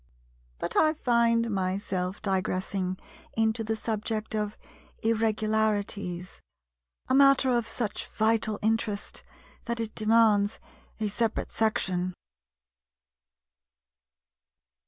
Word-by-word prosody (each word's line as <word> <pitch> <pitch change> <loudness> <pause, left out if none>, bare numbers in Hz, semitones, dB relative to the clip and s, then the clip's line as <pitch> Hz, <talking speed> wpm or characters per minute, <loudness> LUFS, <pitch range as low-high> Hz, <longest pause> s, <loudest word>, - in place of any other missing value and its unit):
But - - -4
I 310 0 +4
find 235 -4 +2
myself 190 -1 -2
digressing 185 -1 -1 0.4
into 225 0 +1
the 220 0 -1
subject 220 0 -3
of 210 -1 -2 0.5
Irregularities, 215 -4 0 0.7
a - - +1
matter 275 -1 +6
of 235 -2 +1
such 225 -2 -3
vital 220 -1 +1
interest 220 -2 -1 0.4
that 235 0 -2
it 225 -1 -3
demands 215 -2 +3 0.4
a 215 - 0
separate 225 +2 -1
section. 185 -5 0
220 Hz, 90 wpm, -28 LUFS, 200-230 Hz, 0.7 s, matter